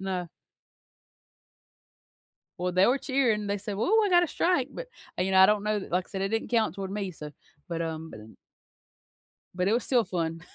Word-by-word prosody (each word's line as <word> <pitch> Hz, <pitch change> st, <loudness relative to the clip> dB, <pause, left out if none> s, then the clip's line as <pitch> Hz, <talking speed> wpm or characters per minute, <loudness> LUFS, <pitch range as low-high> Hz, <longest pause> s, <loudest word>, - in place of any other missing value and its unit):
No. 185 Hz, -3 st, -3 dB, 2.3 s
Well, 180 Hz, +1 st, -1 dB
they 185 Hz, +2 st, +4 dB
were 260 Hz, +3 st, +3 dB
cheering, 240 Hz, -7 st, 0 dB
they 205 Hz, 0 st, -1 dB
said, 200 Hz, 0 st, -5 dB
"Whoo, 420 Hz, -, +3 dB
I 415 Hz, -, +2 dB
got 350 Hz, -2 st, +5 dB
a 350 Hz, -, +2 dB
strike," 295 Hz, -5 st, +1 dB
but, -, -, -7 dB, 0.3 s
uh, -, -, +2 dB
you 190 Hz, -, -1 dB
know, 190 Hz, 0 st, +5 dB
I 190 Hz, -, +9 dB
don't 210 Hz, -1 st, +2 dB
know 210 Hz, 0 st, 0 dB
like 180 Hz, +1 st, 0 dB
I -, -, -17 dB
said, 190 Hz, -, -3 dB
it 195 Hz, -, 0 dB
didn't 225 Hz, +1 st, -2 dB
count 225 Hz, -8 st, +1 dB
toward 195 Hz, -1 st, -5 dB
me, 200 Hz, -2 st, -3 dB
so 150 Hz, -3 st, -9 dB, 0.4 s
but, 165 Hz, -1 st, -2 dB
um 160 Hz, 0 st, -5 dB
b 110 Hz, 0 st, -12 dB, 1.2 s
But 180 Hz, +1 st, 0 dB
it -, -, +2 dB
was 235 Hz, +1 st, +1 dB
still 245 Hz, -4 st, +2 dB
fun. 165 Hz, -2 st, -3 dB
195 Hz, 205 wpm, -27 LUFS, 180-230 Hz, 2.3 s, I